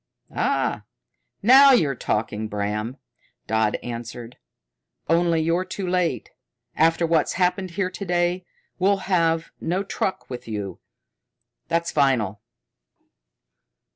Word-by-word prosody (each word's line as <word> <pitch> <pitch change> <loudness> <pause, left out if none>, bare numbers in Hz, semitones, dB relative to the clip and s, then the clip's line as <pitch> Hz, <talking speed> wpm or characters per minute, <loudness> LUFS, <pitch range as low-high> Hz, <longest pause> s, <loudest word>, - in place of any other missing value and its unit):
"Ah, - - 0 0.6
now 270 +5 +8
you're 155 - +3
talking, 110 -2 -2
Bram," 105 +4 -3 0.5
Dodd 110 -1 +1
answered. 120 0 -7 0.7
"Only 165 0 +2
you're 170 +3 +1
too 185 +1 -5
late. 180 -1 -1 0.4
After 165 +2 +3
what's 165 -1 +1
happened 185 +1 0
here 185 -2 0
to 195 - -6
day, 175 0 0 0.4
we'll 195 +1 +2
have 165 -2 +2
no 180 +4 -1
truck 195 -1 -3
with 125 -2 -8
you. 105 -3 -5 0.9
That's 170 0 0
final." 115 -9 +1
165 Hz, 105 wpm, -23 LUFS, 115-180 Hz, 0.9 s, now